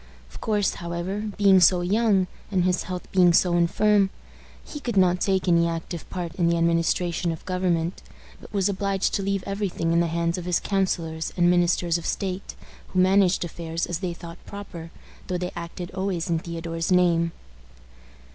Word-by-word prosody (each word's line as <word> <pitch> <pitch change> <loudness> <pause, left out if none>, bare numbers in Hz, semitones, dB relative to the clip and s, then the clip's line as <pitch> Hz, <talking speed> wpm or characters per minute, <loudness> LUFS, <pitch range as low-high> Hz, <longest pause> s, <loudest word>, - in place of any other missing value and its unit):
Of - - -12
course, 210 -3 +1
however, 175 +5 -3
being 195 -2 +6
so 180 0 +5
young, 200 +1 +2 0.2
and 185 -3 +1
his 180 0 +1
health 180 -1 -5
being 180 -2 +5
so 175 0 +3
infirm, 195 +4 +3 0.6
he 295 - -7
could 240 -7 -3
not 180 -1 +3
take 190 -1 +1
any 170 -1 +4
active 165 0 -5
part 175 -3 -4
in 170 -2 +2
the 170 - +2
administration 170 +1 +1
of 160 - -8
government, 180 -2 -1 0.4
but - - -13
was 200 -2 +1
obliged 195 -1 0
to 200 - 0
leave 195 -1 -1
every 200 0 -2
thing 165 -1 -1
in 170 - +4
the 170 - +2
hands 170 +2 -1
of 175 - -7
his 180 -1 +1
counselors 170 -5 -1
and 175 0 +4
ministers 175 -1 +2
of 170 - -6
state, 190 -1 -3 0.3
who 185 - -1
managed 185 -1 +4
affairs 165 0 -4
as 175 -2 -3
they 180 -3 -3
thought 170 0 -11
proper, 175 -5 -8 0.4
though 180 - -1
they 180 0 -3
acted 170 +1 -6
always 185 -3 -2
in 165 - +2
Theodore's 165 0 -4
name. 170 -2 +3
180 Hz, 180 wpm, -25 LUFS, 170-190 Hz, 0.6 s, being